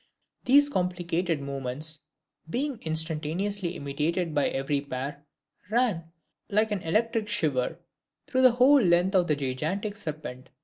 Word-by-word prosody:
These 285 +3 +6
complicated 180 - -1
movements, 140 +3 -3 0.5
being 265 - -2
instantaneously 165 +4 -1
imitated 155 +4 -2
by 145 - +2
every 140 +1 -1
pair, 140 +1 -5 0.5
ran, 220 -7 +1 0.4
like 215 +1 +2
an 205 -3 -1
electric 220 +5 0
shiver, 155 -12 0 0.5
through 260 - +1
the 255 -2 +7
whole 265 +3 +6
length 180 0 +3
of 180 -2 +3
this 150 - +2
gigantic 155 +10 -2
serpent. 155 -9 -6
170 Hz, 125 wpm, -27 LUFS, 150-210 Hz, 0.5 s, the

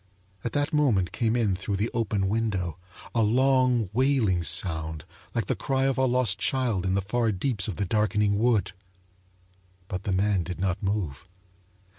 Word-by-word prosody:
At 120 - -3
that 145 +2 -1
moment 120 -12 +2
came 115 -1 0
in 110 -6 +1
through 100 +2 -3
the 105 +4 -1
open 105 -4 0
window 95 -6 -1 0.3
a 115 - +2
long, 125 -2 +2
wailing 125 -8 +2
sound 80 -3 +1 0.3
like 115 -4 0
the - - -1
cry 135 -1 -1
of 135 -1 +1
a 130 - +3
lost 125 -6 +2
child 120 -9 0
in 95 - +1
the 100 - 0
far 115 +3 0
deeps 105 +2 0
of 100 - -4
the 100 - -2
darkening 105 0 +1
wood! 115 -5 +2 1.2
But 90 0 -5
the 100 - -1
man 95 0 +1
did 90 +1 -6
not 95 0 -1
move. 95 -6 -3
105 Hz, 170 wpm, -26 LUFS, 95-120 Hz, 1.2 s, a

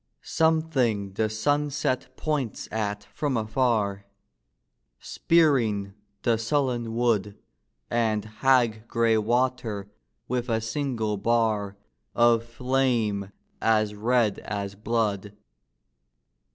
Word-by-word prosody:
Something 140 -11 +1
the 110 +2 0
sunset 145 +3 0
points 145 -7 -2
at 105 -1 -2
from 145 -5 -1
afar, 110 -4 0 0.9
Spearing 115 - +2 0.3
the 115 -3 +2
sullen 120 -2 -1
wood 110 -4 +1 0.5
And 110 -3 0 0.2
hag 120 -4 +3
gray 115 -1 +2
water 115 -3 -1 0.4
with 125 0 -2
a 110 -1 +1
single 115 -3 -2
bar 105 -2 0 0.4
Of 120 -1 +4
flame 115 -5 0 0.3
as 110 -2 +2
red 110 0 +1
as 100 -1 -4
blood. 105 -1 -1
115 Hz, 90 wpm, -26 LUFS, 105-125 Hz, 0.9 s, Of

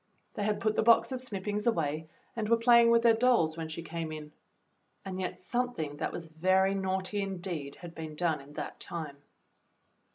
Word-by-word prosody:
They - - -4
had 210 0 0
put 215 -1 +1
the - - +3
box 230 +4 +5
of 255 -1 -3
snippings 210 -2 -3
away 160 -6 0 0.3
and 220 -2 -2
were 230 - +5
playing 235 0 +6
with 230 0 +5
their 230 -1 +7
dolls 225 -9 +3
w^hen 165 -1 -5
she 160 +1 -5
came 165 -1 -4
in. 155 -1 -7 0.7
And 190 -1 -4
yet 185 - -4
something 185 -9 -2
that - - -2
was 170 - -6
very 185 +4 +2
naughty, 190 +1 -1
indeed, 175 -7 -4
had 175 -2 -8
been 160 -2 -7
done 160 -3 0
in 140 +2 -14
that - - -6
time. 155 -5 -5
185 Hz, 190 wpm, -30 LUFS, 160-220 Hz, 0.7 s, their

